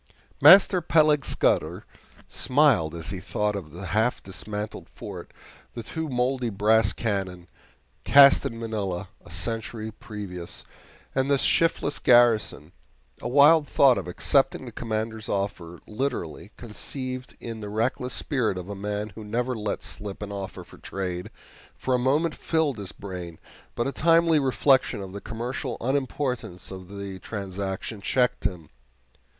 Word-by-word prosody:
Master 180 +4 +8
Peleg 155 -3 +3
Scudder - - 0 0.4
smiled 125 - +2
as 80 -1 -5
he 95 - -4
thought 105 +2 -1
of 95 -6 -6
the 90 +4 -8
half 110 +6 0
dismantled 105 +3 -6
fort, - - -9 0.5
the 115 - -5
two 160 +5 -4
moldy 125 -1 0
brass 105 +1 +3
cannon, 95 -5 -3 0.6
cast 140 -1 +7
in 115 - -4
Manila 105 -5 -3
a - - -15
century 110 +5 -4
previous, 100 -5 -7 0.5
and 135 +1 0
the 140 - +4
shiftless 155 0 +1
garrison. 115 - +4 0.5
A - - -3
wild 145 +4 +6
thought 135 -3 +5
of - - -7
accepting 135 +9 +1
the 120 - -8
Commander's 110 0 -4
offer 90 -4 -3
literally, 105 - -4
conceived 130 +3 -6
in 115 -1 -6
the 105 - -6
reckless 115 +4 -1
spirit 125 -9 -1
of 90 +1 -7
a 100 - -4
man 105 +1 -3
who 110 +2 -10
never 120 +4 -1
let 105 -3 -3
slip 105 0 -5
an 100 - -6
offer 100 -1 -6
for - - -16
trade, 90 -2 -4 0.5
for 130 - -2
a 125 - +3
moment 150 +6 +2
filled 155 -8 0
his 100 -1 -6
brain, 90 -4 -8 0.4
but 120 - 0
a 135 - -1
timely 165 +1 +4
reflection 130 -2 +2
of 95 -1 -7
the 100 - -6
commercial 120 +3 -4
unimportance 125 -7 -2
of 95 -1 -8
the 100 -1 -7
transaction 100 +1 -5
checked 125 +3 +1
him. 90 -6 -3
110 Hz, 145 wpm, -26 LUFS, 100-130 Hz, 0.6 s, Master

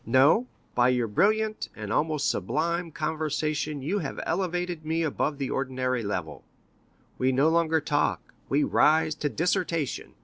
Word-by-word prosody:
"No; 145 - +4 0.3
by 120 0 +4
your 125 -2 +2
brilliant 215 - +1
and 105 0 -4
almost 150 +1 +1
sublime 170 +2 -1
conversation 155 -2 -2
you 190 +9 0
have 145 - -5
elevated 175 -1 -2
me 160 +1 0
above 150 -1 -1
the 135 -2 -3
ordinary 130 -2 -1
level; 90 -8 -4 0.8
we 130 +1 +3
no 135 +4 +3
longer 165 -1 +2
talk, 145 -1 -1 0.2
we 145 +2 +2
rise 155 0 +3
to 145 - -2
dissertation. 165 -3 -1
155 Hz, 140 wpm, -27 LUFS, 130-165 Hz, 0.8 s, No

